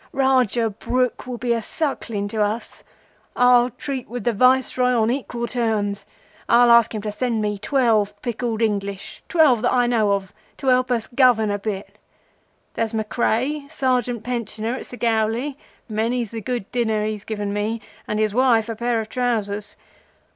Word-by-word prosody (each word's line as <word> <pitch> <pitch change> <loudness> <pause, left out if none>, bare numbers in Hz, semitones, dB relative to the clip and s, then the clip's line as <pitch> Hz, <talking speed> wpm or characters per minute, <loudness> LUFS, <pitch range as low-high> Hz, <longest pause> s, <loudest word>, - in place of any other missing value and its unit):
Rajah 250 -4 +2
Brooke 250 +5 -1
will 250 -1 -4
be 240 0 0
a 230 - -1
suckling 225 -6 -3
to 215 0 -2
us. 210 +3 -2 0.5
I'll 245 0 +5
treat 270 +1 -6
with 245 -1 -5
the 240 - +1
Viceroy 255 +2 +3
on 220 +1 +2
equal 240 -2 -3
terms. 220 -4 -1 0.4
I'll 240 0 +6
ask 235 -1 +5
him 210 - -4
to 210 - -2
send 235 +1 -1
me 210 -1 -1
twelve 215 -4 +1
picked 240 -2 -4
English—twelve 225 - +1
that - - +2
I 245 -1 +3
know 220 -4 +2
of—to 200 +7 -6
help 255 0 +3
us 235 -3 0
govern 240 -4 +3
a 205 - -2
bit. 200 -1 -5 0.7
There's 225 0 -2
Mackray, 245 +6 -1
Sergeant 250 -5 0
pensioner 230 -2 -3
at 260 - -5
Segowli—many's 230 -1 -2
the 225 -1 -5
good 240 -2 -4
dinner 220 -3 0
he's 215 -1 -4
given 205 -2 -3
me, 215 +2 -1 0.3
and 210 - -2
his 215 -1 +1
wife 235 -2 +3
a 225 - -3
pair 235 +1 0
of 220 - -7
trousers. 215 -4 -2
230 Hz, 155 wpm, -22 LUFS, 215-250 Hz, 0.7 s, I'll